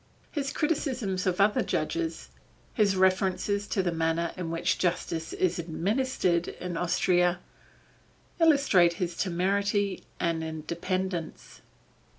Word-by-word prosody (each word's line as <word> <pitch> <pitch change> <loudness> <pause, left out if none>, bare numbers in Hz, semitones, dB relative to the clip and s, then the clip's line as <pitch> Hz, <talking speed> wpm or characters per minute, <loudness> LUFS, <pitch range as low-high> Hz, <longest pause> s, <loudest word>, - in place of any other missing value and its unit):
His 275 -3 -2
criticisms 255 - -1
of 180 0 0
other 205 +1 +4
judges, 335 -1 -2 0.4
his 205 -3 +2
references 190 +2 +1
to 190 - 0
the 175 - 0
manner 165 0 0
in 180 -3 -4
which 165 0 0
justice 170 -2 -1
is 180 -1 0
administered 180 +1 0
in 180 -1 -5
Austria, 175 +1 +2 1.0
illustrate 280 - +5
his 175 -1 -3
temerity 200 +2 0 0.2
and 165 -2 0
independence. 170 +2 -4
185 Hz, 110 wpm, -28 LUFS, 170-205 Hz, 1.0 s, illustrate